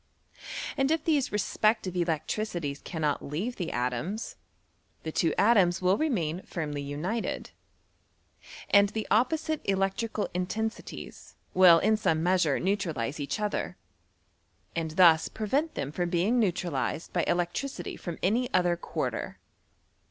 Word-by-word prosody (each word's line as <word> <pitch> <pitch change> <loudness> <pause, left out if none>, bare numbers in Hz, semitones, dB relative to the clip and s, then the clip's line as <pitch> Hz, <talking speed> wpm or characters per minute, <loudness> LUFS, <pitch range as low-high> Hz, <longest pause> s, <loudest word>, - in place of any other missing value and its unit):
And 270 0 +2
if 320 -1 +1
these 295 -5 +2
respective 210 -2 +1
electricities 170 -2 -2
cannot 155 -4 -1
leave 190 - -3
the 175 -4 -3
atoms, 125 - -2 0.7
the 160 - -3
two 165 0 +2
atoms 200 -5 +4
will 185 +1 +3
remain 185 - -1
<firmly 150 -6 -4
united, 155 +11 -3 1.2
and 200 0 +6
the 220 +1 -3
opposite 310 +7 +1
electrical 195 +3 0
intensi 215 +5 -2
ties - - -10 0.2
will 180 -3 +8
in 215 +5 +3
some 160 -6 +1
measure 175 -5 +2
neutralize 165 - -1
each 145 +9 -3
other, 210 -1 -2 1.0
and 160 -2 -3
Ihus 165 -3 +6
prevent 275 +9 -1
them 140 - -3
from 175 +2 -1
being 190 +8 +2
neutralized 175 - -1
by - - +1
elec 175 0 +1
tricity 275 -1 -4
from 175 -3 -5
any 240 +6 +1
other 175 -1 +3
quarter. 170 - -4
185 Hz, 130 wpm, -28 LUFS, 160-220 Hz, 1.2 s, will